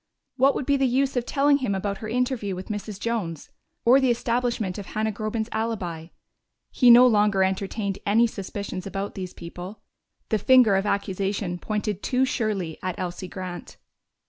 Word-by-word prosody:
What 270 +1 +4
would 270 - -2
be 280 0 +2
the 270 -1 +2
use 265 +2 +1
of 245 -1 -1
telling 285 0 +3
him 255 -8 -1
about 200 0 -3
her 215 - -6
interview 245 -5 -1
with 185 +4 -8
Mrs. 210 -1 -5
Jones, 205 -9 -3 0.3
or 250 +3 +7
the 265 -2 +2
establishment 235 -5 -1
of 200 - -8
Hannah 220 0 -1
Groben's 215 +1 -3
alibi? 195 -8 -3 0.6
He 250 - +4
no 240 +1 +9
longer 210 -4 +3
entertained 195 +1 -2
any 220 +4 +4
suspicions 200 -3 -5
about 195 +1 -4
these 185 -2 -7
people: 180 +4 -9 0.5
the 220 - +1
finger 250 -2 +5
of 195 +2 0
accusation 195 -2 -2
pointed 210 -1 -3
too 255 +1 +1
surely 205 -10 -2
at 185 -1 -3
Elsie 180 +1 -5
Grant. 180 -1 -7
210 Hz, 170 wpm, -25 LUFS, 190-240 Hz, 0.6 s, no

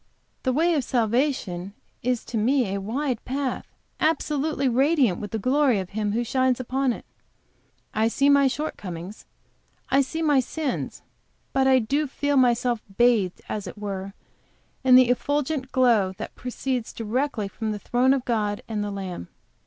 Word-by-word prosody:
The 260 - +1
way 330 +6 +2
of 290 -4 +1
salvation 225 -6 0 0.3
is 250 -1 -1
to 235 - -7
me 240 -2 +2
a 200 - -2
wide 250 +4 -2
path, 265 0 -3 0.3
absolutely 300 -2 0
radiant 260 - +3
with 205 - -5
the 220 - -2
glory 260 +2 +2
of 190 -2 -4
Him 210 0 -1
who 235 +2 0
shines 255 +1 +1
upon 260 +1 0
it; - - -7 0.9
I 220 +1 +2
see 275 +5 +2
my 280 -1 +6
shortcomings; 200 - -5 0.6
I 270 +1 +5
see 320 +5 -3
my 295 -3 +4
sins, 285 +2 -3 0.5
but 265 0 +3
I 260 -1 +5
feel 285 +3 0
myself 245 -2 +3 0.2
bathed, 230 -7 +3
as 205 -2 -4
it 175 - -8
were, 200 -1 -5 0.7
in 255 -1 +7
the 255 -1 +7
effulgent 285 +2 -1
glow 230 -7 +3
that - - -6
proceeds 250 -1 -3
directly 230 0 -2
from 220 +2 -4
the 210 - -3
throne 250 +5 +2
of 260 - -4
God 210 -3 -1
and 215 -2 -2
the 205 - -3
Lamb. 190 - -5
250 Hz, 160 wpm, -25 LUFS, 210-275 Hz, 0.9 s, in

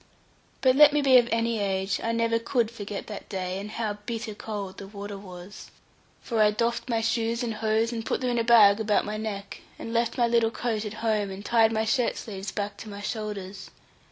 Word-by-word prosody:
But 260 -1 +4
let 295 +1 +8
me 295 -1 +2
be 265 -2 +7
of 240 0 0
any 230 0 +1
age, 195 0 -1
I 230 - 0
never 230 0 +1
could 230 -1 0
forget 205 -3 -6
that 210 - -8
day, 185 -1 -3
and 205 +1 -6
how 210 -2 -3
bitter 225 -2 -4
cold 205 -2 -6
the 195 - -8
water 205 0 -7
was. 185 0 -10 0.5
For 230 -3 0
I 210 - +6
doffed 235 +4 -1
my 230 -1 +1
shoes 230 +1 0
and 230 -2 -2
hose, 220 +1 0
and 225 -1 -3
put - - -1
them 255 -1 -1
into 240 -1 +1
a - - -1
bag 220 -3 +6
about 215 -1 +1
my 210 +1 -3
neck; 205 -2 -5 0.2
and 230 - -6
left 235 +2 0
my 240 - +4
little 235 -1 +3
coat 225 -2 -2
at 210 - -5
home, 210 -3 +1
and 195 +2 -8
tied 225 -1 +4
my 220 0 0
shirt 245 +1 +1
sleeves 195 -2 -6
back 205 -1 -4
to 220 - -9
my 200 0 -8
shoulders. 205 -3 -5
220 Hz, 220 wpm, -26 LUFS, 205-230 Hz, 0.5 s, let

